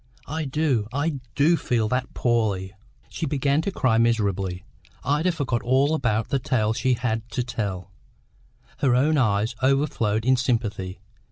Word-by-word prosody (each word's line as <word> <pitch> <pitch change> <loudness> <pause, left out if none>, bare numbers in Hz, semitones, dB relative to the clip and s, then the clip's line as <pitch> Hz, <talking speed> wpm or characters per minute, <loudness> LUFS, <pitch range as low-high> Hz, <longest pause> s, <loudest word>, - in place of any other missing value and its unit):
I 155 +1 -3
do, 135 -6 0
I 145 +2 -1 0.2
do 155 +4 +4
feel 115 -8 0
that 125 +1 -2
poorly!" 105 -6 0 0.3
She 165 - -4
began 140 +1 +1
to 195 - -2
cry 125 -10 +2
miserably. 100 -5 0 0.4
Ida 150 +6 +1
forgot 135 -8 -1
all 135 +5 +2
about 115 -7 0
the 140 - +1
tale 110 -4 0
she 125 +2 +1
had 115 -1 -2
to 125 +1 -2
tell; 95 -6 -4 0.9
her 130 -3 +3
own 150 +4 +3
eyes 110 -1 +1
overflowed 130 -5 +1
in 130 0 +4
sympathy. 105 -7 -1
125 Hz, 150 wpm, -24 LUFS, 110-140 Hz, 0.9 s, do